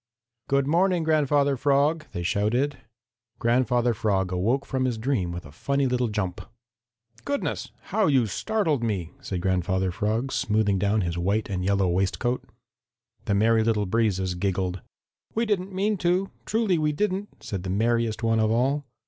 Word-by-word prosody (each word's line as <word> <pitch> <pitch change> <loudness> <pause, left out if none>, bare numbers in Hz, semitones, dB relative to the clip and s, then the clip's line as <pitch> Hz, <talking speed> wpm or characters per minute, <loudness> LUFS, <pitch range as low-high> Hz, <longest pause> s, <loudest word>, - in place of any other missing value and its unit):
"Good 140 0 +2
morning, 175 +3 +2
Grandfather 145 -3 +2
Frog!" 145 +4 +2
they 85 - -4
shouted. 115 +10 0 0.6
Grandfather 120 0 +2
Frog 100 -4 0
awoke 115 +10 0
from 130 -1 -1
his 125 -3 -1
dream 110 -7 -1
with 85 -1 -6
a 75 - -12
funny 140 - 0
little 125 -1 +1
jump. 105 -4 -3 0.8
"Goodness, 285 0 -2 0.2
how 215 -2 +3
you 135 -5 +4
startled 160 - 0
me!" 95 -7 -2
said 90 -3 -4
Grandfather 95 0 0
Frog, 110 +7 -1
smoothing 105 -2 +1
down 105 +2 +2
his 85 -1 -2
white 100 +4 0
and 90 -1 -2
yellow 100 0 +2
waistcoat. 95 +8 0 0.8
The 100 - +1
Merry 110 +2 +4
Little 110 -2 +1
Breezes 95 -3 0
giggled. 95 -1 -2 0.5
"We 230 +2 +1
didn't 195 -3 -1
mean 200 +3 0
to, 180 +2 +1 0.2
truly 215 -6 +1
we 150 -1 +1
didn't," 200 +4 -3
said 100 -3 -4
the 95 - -5
merriest 115 +2 0
one 115 0 +2
of 110 -1 +2
all. 135 +6 +1
115 Hz, 155 wpm, -25 LUFS, 95-145 Hz, 0.8 s, you